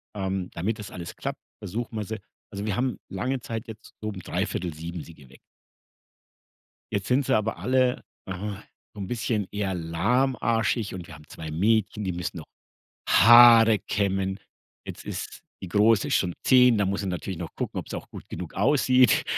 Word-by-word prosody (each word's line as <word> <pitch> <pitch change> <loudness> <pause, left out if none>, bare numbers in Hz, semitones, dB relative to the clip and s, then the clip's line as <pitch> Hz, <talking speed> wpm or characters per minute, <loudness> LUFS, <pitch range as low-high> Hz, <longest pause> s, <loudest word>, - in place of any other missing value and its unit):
ähm, 95 -2 -2
damit 105 +6 -2
das 105 - -8
alles 85 -2 -7
klappt, - - -5 0.2
versuchen 115 +4 -5
wir 105 - -2
sie 110 +2 -5 0.3
also 100 +1 -5
wir 105 -3 -1
haben 125 0 0
lange 125 +7 -2
Zeit 115 -1 -5
jetzt 110 -1 -11
so 110 - -5
um 100 -3 -5
06:45 85 -4 -4
sie 85 - -13
geweckt. 65 -3 -17 1.5
Jetzt 100 -1 -2
sind 130 +2 +2
sie - - +3
aber 110 -4 -1
alle, 125 +5 +1 0.2
äh, 95 - -4 0.6
so 105 - -9
'n 95 - -3
bisschen 110 -3 -1
eher 100 -2 -2
lahmarschig 110 +5 0
und 90 -2 -7
wir 85 - -11
haben 75 0 -15
2 80 -1 -8
Mädchen, 105 +4 +1
die 95 - -1
müssen 90 0 -4
noch 80 - -9 0.6
Haare 115 0 +8
kämmen. 95 0 -1 0.5
Jetzt - - -8
ist - - -6 0.2
die 95 - -7
Große 105 +3 +3
schon 90 -2 +1
10, 125 -3 +6
da 100 - +2
muss 100 +2 -1
ich 95 - -2
natürlich 90 0 -4
noch 85 - -7
gucken, - - -3
ob's - - -8
auch - - -6
gut - - -11
genug 85 -2 -7
aussieht. 130 +3 +4
100 Hz, 175 wpm, -26 LUFS, 90-115 Hz, 1.5 s, Haare